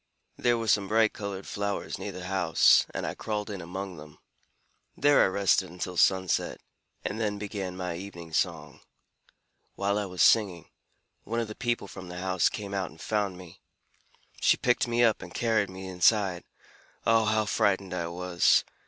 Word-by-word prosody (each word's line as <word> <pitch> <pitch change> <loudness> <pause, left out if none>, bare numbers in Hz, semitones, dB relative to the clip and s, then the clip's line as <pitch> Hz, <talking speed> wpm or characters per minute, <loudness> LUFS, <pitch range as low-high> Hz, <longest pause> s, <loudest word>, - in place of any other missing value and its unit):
There 120 -1 +2
were 115 -1 -3
some 100 -2 +3
bright 110 +1 +3
colored 100 -2 -6
flowers 100 0 -3
near - - -5
the 90 0 -8
house, 90 -4 +4
and - - -4
I - - -3
crawled 105 -1 -4
in 100 -2 -5
among 90 +1 -6
them. 75 0 -12 0.8
There 145 +1 +5
I - - +4
rested 95 -1 +2
until 90 +1 -5
sunset, 95 0 +2 0.5
and 110 - -3
then 105 -2 -1
began 100 -3 -5
my 90 -2 -3
evening 85 -3 -9
song. - - -1 1.0
While 100 +1 0
I 105 - -2
was 90 -1 0
singing, 95 -7 +3 0.5
one 115 +2 -2
of 115 - -2
the 110 - -7
people 120 -3 -2
from 95 -1 -10
the 90 0 -8
house 90 -1 +1
came 100 -1 -6
out 95 -3 -2
and 80 - -17
found 100 -2 -1
me. 90 -2 -13 0.8
She - - +4
picked 125 0 +1
me 120 0 +2
up 115 -2 +3
and 85 - -10
carried 110 -4 +1
me 95 0 -8
inside. 95 0 +2 0.6
Oh, 115 -1 +4
how 110 0 +2
frightened 95 -2 +1
I 85 -2 -2
was! 85 0 +2
95 Hz, 175 wpm, -28 LUFS, 90-105 Hz, 1.0 s, There